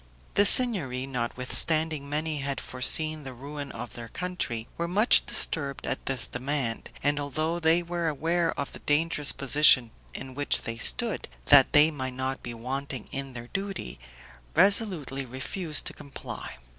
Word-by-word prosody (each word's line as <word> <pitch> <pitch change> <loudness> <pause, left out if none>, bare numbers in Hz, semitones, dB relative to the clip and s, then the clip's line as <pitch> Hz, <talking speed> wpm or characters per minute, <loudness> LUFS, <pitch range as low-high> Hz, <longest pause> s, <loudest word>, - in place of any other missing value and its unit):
The 205 - +4
Signory, 165 - +6
notwithstanding 140 +4 0
many 155 +1 -3
had 140 0 -3
foreseen 155 +4 0
the 130 -2 -9
ruin 140 +2 -8
of 115 +1 -8
their 115 -1 -9
country, 180 -11 -5
were 170 - -3
much 210 +7 +3
disturbed 140 -4 -1
at - - -4
this 135 -2 +2
demand; 125 -2 -4
and 145 +1 +1
although 155 +4 -2
they 165 +1 +2
were 170 -1 -3
aware 165 +3 0
of 140 - -4
the - - -9
dangerous 150 0 +2
position 135 -3 +4 0.2
in 130 -1 -8
which 145 +2 -2
they 115 0 -6
stood, 235 - -1 0.2
that 145 -2 +6
they 150 +2 +6
might 130 -3 -6
not 130 +1 -4
be 120 -1 -7
wanting 130 +1 -6
in 135 -1 -2
their 120 0 -9
duty, 195 - -5 0.6
resolutely 180 - +2
refused 145 +6 -3
to - - -3
comply. 140 -2 -9
145 Hz, 155 wpm, -26 LUFS, 130-160 Hz, 0.6 s, Signory